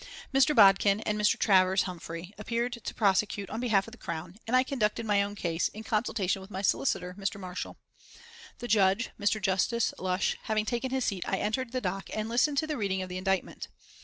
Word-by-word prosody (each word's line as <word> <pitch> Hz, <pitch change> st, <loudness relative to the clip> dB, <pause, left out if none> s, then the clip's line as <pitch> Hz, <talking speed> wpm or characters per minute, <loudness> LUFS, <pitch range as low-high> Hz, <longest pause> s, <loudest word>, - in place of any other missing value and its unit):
Mr. 270 Hz, +2 st, +4 dB
Bodkin 200 Hz, -1 st, +6 dB
and 215 Hz, -, -1 dB
Mr. 210 Hz, 0 st, +2 dB
Travers 190 Hz, -1 st, +4 dB
Humphreys 170 Hz, -1 st, -7 dB
appeared 235 Hz, +3 st, -2 dB
to -, -, -4 dB
prosecute 200 Hz, -1 st, +1 dB
on 220 Hz, -, -3 dB
behalf 215 Hz, -5 st, +2 dB
of -, -, -10 dB
the 245 Hz, -, -14 dB
Crown, 170 Hz, +2 st, -6 dB
and 240 Hz, -, +1 dB
I 255 Hz, -, +5 dB
conducted 230 Hz, -4 st, -1 dB
my 205 Hz, -2 st, +3 dB
own 200 Hz, +1 st, -3 dB
case, 170 Hz, -4 st, -1 dB
in 220 Hz, -, -9 dB
consultation 210 Hz, -4 st, -1 dB
with 190 Hz, -, -12 dB
my 195 Hz, -1 st, -5 dB
solicitor, 180 Hz, -4 st, 0 dB
Mr. 195 Hz, +1 st, -2 dB
Marshall. 185 Hz, -1 st, -6 dB, 0.8 s
The 240 Hz, -, -6 dB
Judge, 205 Hz, 0 st, +3 dB
Mr. 210 Hz, +1 st, +1 dB
Justice 205 Hz, +4 st, +1 dB
Lush, 185 Hz, +1 st, 0 dB
having 215 Hz, -1 st, 0 dB
taken 240 Hz, +3 st, -2 dB
his 260 Hz, -1 st, -1 dB
seat 190 Hz, -3 st, -1 dB
I 195 Hz, -, 0 dB
entered 230 Hz, +5 st, -2 dB
the 255 Hz, 0 st, -2 dB
dock 195 Hz, 0 st, -3 dB
and 215 Hz, 0 st, -2 dB
listened 265 Hz, +5 st, +2 dB
to 315 Hz, -, +2 dB
the 305 Hz, -2 st, -3 dB
reading 190 Hz, -3 st, -1 dB
of 185 Hz, -, -8 dB
the 180 Hz, -, -4 dB
indictment. 190 Hz, 0 st, -2 dB
205 Hz, 205 wpm, -29 LUFS, 190-230 Hz, 0.8 s, Bodkin